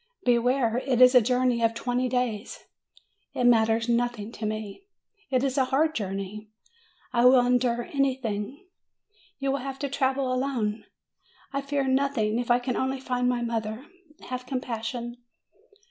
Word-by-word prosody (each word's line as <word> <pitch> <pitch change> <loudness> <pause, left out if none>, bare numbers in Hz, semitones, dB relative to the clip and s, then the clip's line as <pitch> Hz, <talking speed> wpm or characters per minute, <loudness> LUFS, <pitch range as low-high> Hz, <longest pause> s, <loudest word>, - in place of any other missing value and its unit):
"Beware; 245 0 +2
it 255 -3 +2
is 250 0 +8
a 250 - +7
journey 250 0 +1
of 230 0 +2
twenty 245 +2 -1
days." 245 -3 -2 0.7
"It - - -1
matters 225 -1 +3
nothing 235 -2 -1
to 220 - -4
me." 215 - -6 0.4
"It 255 -1 +1
is 275 0 0
a 260 - +3
hard 295 +5 +1
journey." 200 -1 -5 0.6
"I 240 0 +3
will 250 -1 +7
endure 245 -1 +1
everything." 265 - -2 0.7
"You 275 -1 -1
will 275 - -1
have 270 +1 -5
to 280 0 -3
travel 265 -1 0
alone." 250 -5 -1 0.7
"I 275 - -1
fear 280 -1 -1
nothing, 260 -5 +1
if 245 - -4
I 240 - +5
can 245 0 -3
only 265 0 -1
find 250 -1 0
my 245 -1 0
mother. 225 +1 -3 0.4
Have 255 0 -5
compassion!" 240 -1 -4
250 Hz, 150 wpm, -26 LUFS, 230-265 Hz, 0.7 s, is